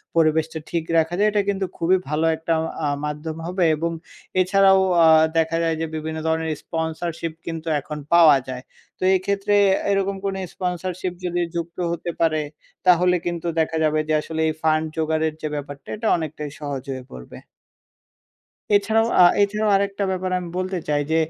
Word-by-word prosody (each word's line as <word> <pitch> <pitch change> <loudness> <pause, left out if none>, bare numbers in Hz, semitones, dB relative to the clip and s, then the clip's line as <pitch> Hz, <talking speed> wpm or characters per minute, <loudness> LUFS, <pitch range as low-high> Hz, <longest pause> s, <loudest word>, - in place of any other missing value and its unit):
পরিবেশটা 160 0 +2
ঠিক 170 -2 -1
রাখা 160 +1 +2
যায়। 210 +1 +4
এটা 205 - +2
কিন্তু 195 -1 0
খুবই 175 +3 +3
ভালো 155 +2 0
একটা 165 +1 -1 0.3
অ্যা 150 -2 0 0.2
মাধ্যম 150 +2 -5
হবে 180 +1 0
এবং 165 +2 -2 0.5
এছাড়াও 190 +1 +5 0.3
আ - - +7 0.3
দেখা 165 +1 +1
যায় 165 -1 +1
যে - - 0
বিভিন্ন 160 0 -4
ধরনের 160 0 0
স্পন্সরশিপ 165 0 -3
কিন্তু 165 -1 -5
এখন 150 +2 -7 0.2
পাওয়া 165 -5 +7
যায়। 130 -1 -6 0.4
তো - - -5
এক্ষেত্রে 200 +2 0 0.4
এরকম 195 0 0
কোনো 195 -1 -1 0.2
স্পন্সরশিপ 180 0 -3
যদি 175 0 -1
যুক্ত 170 0 -4
হতে 170 0 -3
পারে 155 -2 +2 0.5
তাহলে 180 0 +5
কিন্তু 175 -1 -3
দেখা 160 0 0
যাবে 155 0 +2
যে 155 - 0
আসলে 160 +1 -4
এই 155 - 0
ফান্ড 155 0 +2
জোগাড়ের 160 0 0
যে 155 - -2
ব্যাপারটা 145 -1 -7
এটা 220 +1 -3
অনেকটাই 150 -2 -5
সহজ 140 -3 -4
হয়ে 130 -1 -5
পড়বে। 60 -1 -10 1.4
এছাড়াও, 220 +3 +3
আ - - +9 0.2
এছাড়াও 210 +1 +1
আরেকটা 200 0 0
ব্যাপার 185 0 -2
আমি 175 -1 -7
বলতে 185 0 -2
চাই 145 -1 +2
যে 160 - +3
165 Hz, 165 wpm, -22 LUFS, 155-185 Hz, 1.4 s, আ